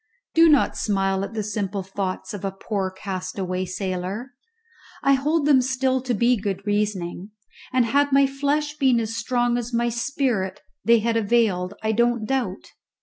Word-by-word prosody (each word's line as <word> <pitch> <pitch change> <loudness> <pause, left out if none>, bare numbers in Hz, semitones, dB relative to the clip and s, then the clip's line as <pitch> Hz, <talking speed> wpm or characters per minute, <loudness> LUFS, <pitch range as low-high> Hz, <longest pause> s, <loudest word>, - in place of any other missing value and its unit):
Do 330 0 +6
not 290 -4 +4
smile 195 -2 0
at 215 - -6
the 215 - -1
simple 200 -2 -3
thoughts 190 0 -4
of 205 - -7
a 195 - 0
poor 195 0 -3
castaway 185 -1 -4
sailor. 190 +6 -4 0.7
I 275 - +5
hold 290 +3 +1
them 280 -3 +5
still 260 0 0
to 250 -2 -1
be 240 +3 +3
good 200 -1 -4
reasoning, 205 -3 -2 0.4
and 255 -2 +3
had 285 +4 +2
my 275 0 +5
flesh 285 +2 -1
been 260 -4 +4
as 225 0 -3
strong 240 +1 0
as 240 0 -4
my 235 0 +1
spirit 235 -5 -1 0.2
they 230 -1 +5
had 230 +1 +1
availed, 205 -4 +1
I 220 - +1
don't 235 0 +1
doubt. 235 -7 -2
225 Hz, 165 wpm, -23 LUFS, 195-255 Hz, 0.7 s, Do